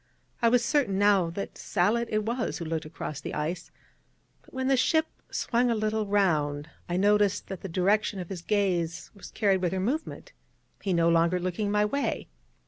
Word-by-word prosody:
I 230 - +5
was 235 0 +3
certain 260 -11 +1
now 200 -4 +4
that 195 +4 -6
Sallitt 215 +5 +1
it 215 0 0
was 240 +2 -2
who 170 - -5
looked 160 -1 -3
across 155 -2 -6
the - - -5
ice: 155 +4 -3 0.7
but - - -22
when 260 0 -2
the 270 - +4
ship 315 +5 +3 0.2
swung 240 +1 +1
a 230 - +2
little 215 0 -1
round, 155 -7 +1 0.2
I 175 - 0
noticed 205 +1 +2
that 190 - -6
the 195 - -6
direction 195 +3 +1
of 180 - -6
his 185 -3 -5
gaze 180 -5 -1
was 200 - -11
carried 195 -4 +1
with 180 -1 0
her 190 - -1
movement, 305 - -3 0.5
he 195 - -2
no 170 -1 +3
longer 170 +2 +3
looking 185 +3 -2
my 210 0 +2
way. 280 +7 -2
200 Hz, 190 wpm, -28 LUFS, 175-220 Hz, 0.7 s, I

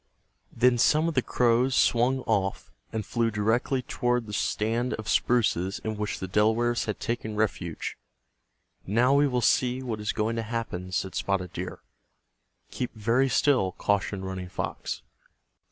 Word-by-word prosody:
Then 120 +1 +3
some 155 +6 +4
of 165 - -1
the 130 - +2
crows 125 +2 +2
swung 125 +3 +3
off, 100 - -1 0.2
and 110 -2 -3
flew 115 +1 0
directly 115 +5 0
toward 120 -1 0
the 105 - -8
stand 115 +4 0
of 110 -1 -8
spruces 100 -6 +1
in 110 -1 -2
which 105 -1 -3
the 95 - -5
Delawares 110 +5 +2
had 105 - -3
taken 115 -2 -3
refuge. 100 -6 -2 0.9
"Now 120 +7 +3
we 145 +1 +4
will 125 -2 0
see 125 +2 +2
what 115 -4 -3
is 105 - -1
going 115 +2 -1
to - - 0
happen," 110 -5 -4
said 95 +1 -2
Spotted 95 -3 -1
Deer. - - -6 0.9
"Keep 125 -2 -4
very 115 +5 +2
still," 125 -8 +2
cautioned 100 -1 -1
Running 95 -1 -5
Fox. - - -4
115 Hz, 155 wpm, -27 LUFS, 105-125 Hz, 0.9 s, some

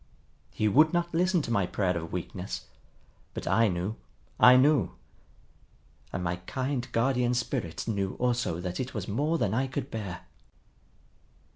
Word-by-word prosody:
He 110 - 0
would 155 - +5
not 175 0 0
listen 180 0 +2
to 120 - -4
my 100 -5 +2
prayer 90 0 0
of 80 -1 -4
weakness. 90 +1 -5 0.7
But - - -5
I 115 0 +4
knew, 95 +3 -2 0.4
I 125 +1 +9
knew! 145 +2 +3 1.2
And 90 - -3
my 85 0 -1
kind 130 -1 -2
Guardian 125 0 +2
Spirit 90 -8 -3
knew 100 -4 -1
also 120 -9 0
that 90 0 -4
it 130 -1 -4
was 100 -3 -3
more 150 +10 0
than 100 -9 0
I 130 +4 +1
could 130 0 -4
bear. 100 -6 -5
115 Hz, 150 wpm, -28 LUFS, 95-135 Hz, 1.2 s, I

